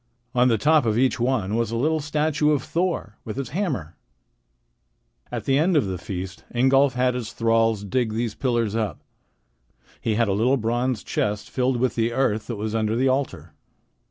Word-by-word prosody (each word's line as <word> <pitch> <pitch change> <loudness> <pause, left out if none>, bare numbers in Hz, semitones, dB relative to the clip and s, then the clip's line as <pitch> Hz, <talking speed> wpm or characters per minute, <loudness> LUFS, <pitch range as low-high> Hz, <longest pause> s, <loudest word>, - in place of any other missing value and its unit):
On 125 -1 +4
the 115 -3 +3
top 150 +1 +3
of 110 0 +1
each 130 +1 +2
one 120 -5 0
was 115 -1 0
a 115 - -3
little 155 +7 +1
statue 150 0 +1
of 145 - 0
Thor 170 - -2
with 110 - -6
his 135 -3 -3
hammer. 135 - -3 1.3
At - - -4
the 135 +1 +3
end 170 +1 +3
of 135 - +3
the 95 -2 -4
feast 95 0 -6
Ingolf 135 +2 +4
had 125 0 +1
his 120 -3 -4
thralls 115 -2 +2
dig 110 +3 0
these 115 0 -2
pillars 120 -5 0
up. 105 -9 -2 1.0
He 110 - 0
had 115 0 +2
a 100 - +1
little 120 +7 +2
bronze 120 0 -1
chest 105 0 -2
filled 130 -1 +1
with 125 0 +1
the 115 0 0
earth 110 -4 0
that 120 - -3
was 110 +1 -4
under 110 0 0
the 130 +3 +2
altar. 95 - -2
120 Hz, 185 wpm, -24 LUFS, 110-135 Hz, 1.3 s, On